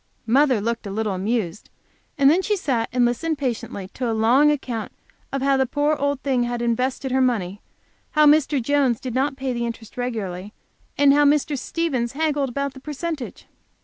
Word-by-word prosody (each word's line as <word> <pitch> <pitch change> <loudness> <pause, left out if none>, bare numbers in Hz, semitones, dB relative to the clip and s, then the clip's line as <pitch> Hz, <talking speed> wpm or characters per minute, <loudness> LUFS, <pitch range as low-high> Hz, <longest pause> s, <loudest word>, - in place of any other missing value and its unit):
Mother 260 0 +3
looked 230 +1 -3
a - - -5
little 210 0 -1
amused, 195 -1 -2 0.5
and 275 -1 +4
then 325 +6 +5
she 420 +2 0
sat 250 -10 -1
and 245 0 +3
listened, 305 +7 -1
patiently, 235 -7 -4
to 250 -2 -2
a - - 0
long 250 +7 +4
account 255 -6 -2 0.4
of 275 -1 -2
how 275 0 +3
the 265 -1 +1
poor 290 +3 +1
old 285 -1 -1
thing 265 -3 +1
had 240 0 -1
invested 250 +3 -1
her 260 +1 +2
money; 205 -6 0 0.5
how 305 -1 +5
Mr. 295 -1 +4
Jones 260 -2 +1
did 255 -3 -5
not 270 +2 0
pay 265 -2 -2
the 235 0 -2
interest 230 -1 -8
regularly, 210 -5 -4 0.4
and 285 -1 +6
how 290 +1 +4
Mr. 290 0 +2
Stevens 265 -5 -2
haggled 290 -2 0
about 280 +2 -3
the 265 - -11
percentage. 300 0 -5
260 Hz, 185 wpm, -22 LUFS, 235-285 Hz, 0.5 s, and